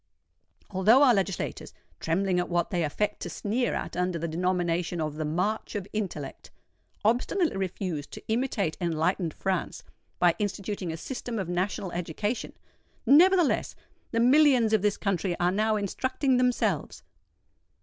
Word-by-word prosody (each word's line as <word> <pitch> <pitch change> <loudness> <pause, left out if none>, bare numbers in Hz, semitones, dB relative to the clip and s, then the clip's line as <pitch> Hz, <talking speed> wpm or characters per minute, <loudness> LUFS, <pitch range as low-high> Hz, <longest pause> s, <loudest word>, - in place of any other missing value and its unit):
Although 210 +8 +5
our 255 -4 +6
legislators—trembling 190 -1 -2
at 180 - -2
what 175 -1 0
they 175 -3 0
affect 205 +7 -1
to - - -5
sneer 235 +4 -1
at - - -4
under 180 0 0
the 165 +1 -3
denomination 175 0 -1
of 155 -2 -2
"the 155 +1 -3
march 185 +10 -2
of 200 -2 -3
intellect"—obstinately 210 - -3
refuse 180 -5 -3
to - - -10
imitate 220 -7 0
enlightened 170 +1 0
France 190 +3 -3 0.3
by 175 -1 +4
instituting 200 -3 -3
a 160 - -5
system 245 +3 -5
of 190 -4 -2
national 185 +1 -2
education,—nevertheless, 255 - +1 0.3
the 230 - -1
millions 250 -3 +5
of 215 - +4
this 210 0 +1
country 185 -2 -1
are 175 0 +2
now 215 +3 +1
instructing 260 +6 0
themselves! 235 - 0
195 Hz, 130 wpm, -27 LUFS, 175-225 Hz, 0.3 s, our